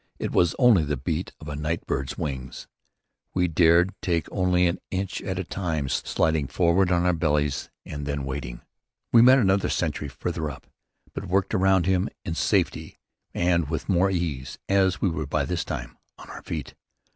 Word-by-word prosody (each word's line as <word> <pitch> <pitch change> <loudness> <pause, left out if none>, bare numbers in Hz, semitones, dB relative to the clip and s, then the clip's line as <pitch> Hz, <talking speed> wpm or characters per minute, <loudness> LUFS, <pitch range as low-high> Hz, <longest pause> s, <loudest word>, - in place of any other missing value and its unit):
It - - -3
was 85 -2 +3
only 120 -10 +5
the 75 -1 -2
beat 80 +6 -3
of 80 - -11
a 75 - -4
night 75 +3 -3
bird's 65 -1 -3
wings. 65 -2 -5 0.7
We 90 -1 +2
dared 85 +3 +4
take 85 -3 0
only 90 -1 +2
an 85 0 0
inch 95 0 -3
at 95 -2 -4
a 95 - -1
time, 80 -6 -3
sliding 80 +1 0
forward 90 +3 +2
on 90 0 +2
our 90 - +3
bellies 75 -4 0 0.2
and 75 -1 -6
then 70 -1 -2
waiting. 60 -3 -5 0.5
We 115 - +7
met 130 +2 +8
another 100 -5 +2
sentry 75 -3 -1
farther 75 +2 -4
up, 70 - -10 0.5
but - - -6
worked 95 +2 0
around 95 -2 +3
him 95 -1 +1 0.2
in 80 - -2
safety - - 0 0.4
and 85 -3 +1
with 80 -3 -3
more 95 0 +3
of 95 - -1
ease, 75 -7 -3
as 95 -2 +2
we 95 - +3
were 75 -2 -3
by 70 0 0
this 85 +4 -2
time - - -6 0.2
on - - -12
our - - -9
feet. 75 -5 -5
85 Hz, 185 wpm, -25 LUFS, 75-90 Hz, 0.7 s, met